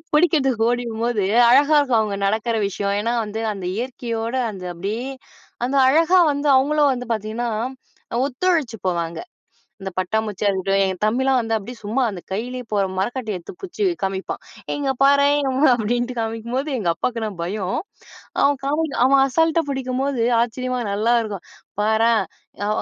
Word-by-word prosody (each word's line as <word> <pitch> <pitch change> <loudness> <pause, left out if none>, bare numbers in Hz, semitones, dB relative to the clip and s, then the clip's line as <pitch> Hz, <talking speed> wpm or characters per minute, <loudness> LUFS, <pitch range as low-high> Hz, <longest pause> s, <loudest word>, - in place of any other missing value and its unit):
புடிக்றதுக்கு 270 -8 +3
ஓடிவரும்போது 235 -3 -1 0.2
அழகாருக்கும் 285 -2 +4
அவுங்க 205 -2 -2
நடக்கற 220 +3 0
விஷயம், 200 0 -2
ஏன்னா 230 +3 0
வந்து 215 +1 -5
அந்த 195 -3 -7
இயற்கையோட 235 -1 -3 0.2
அந்த 190 -3 -9
அப்டியே 215 +9 -3 0.6
அந்த 260 +3 -2
அழகா 330 +6 +4
வந்து 285 +1 -2
அவுங்களும் 290 +1 +3
வந்து 250 -1 -5
பாத்தீங்கன்னா, 220 +3 -3 0.8
ஒத்துழைச்சு 285 -3 0
போவாங்க. 170 -2 -2 0.6
அந்த 190 0 -5
பட்டாம்பூச்சியா 210 +2 -1
இருக்கட்டும், 195 +1 +1
என் 190 -1 -2
தம்பிலாம் 260 +4 +2
வந்து 225 -2 -1
அப்டியே 220 +4 -6
சும்மா 220 +6 0
அந்த 190 -3 -7
கையிலயே 250 +5 -4
போற 200 -1 +2
மரவட்டைய 220 0 -2
எத்து 170 - -10
புச்சு 385 +2 -3 0.2
காமிப்பான், 190 0 -3 0.3
"ஏ - - 0
இங்க 275 -2 0
பாரேன்" 280 +1 +4 0.3
அப்டின்ட்டு 240 +2 -1
காமிக்கும்போது 230 +5 -3
எங்க 195 -6 -2
அப்பாக்குனா 225 +3 -2
பயம், 190 +1 -2 0.6
அவன் 280 -1 +3
காமெடி 300 +1 -1
அவன் 270 +1 +5
அசால்டா 325 +4 +2
பிடிக்கும்போது, 265 -1 -1 0.2
ஆச்சரியமா 250 +2 -2
நல்லாயிருக்கும். 215 -2 0 0.4
"பாரேன்" 220 +1 +3 0.4
அ - - -1
235 Hz, 135 wpm, -21 LUFS, 210-270 Hz, 0.8 s, அவன்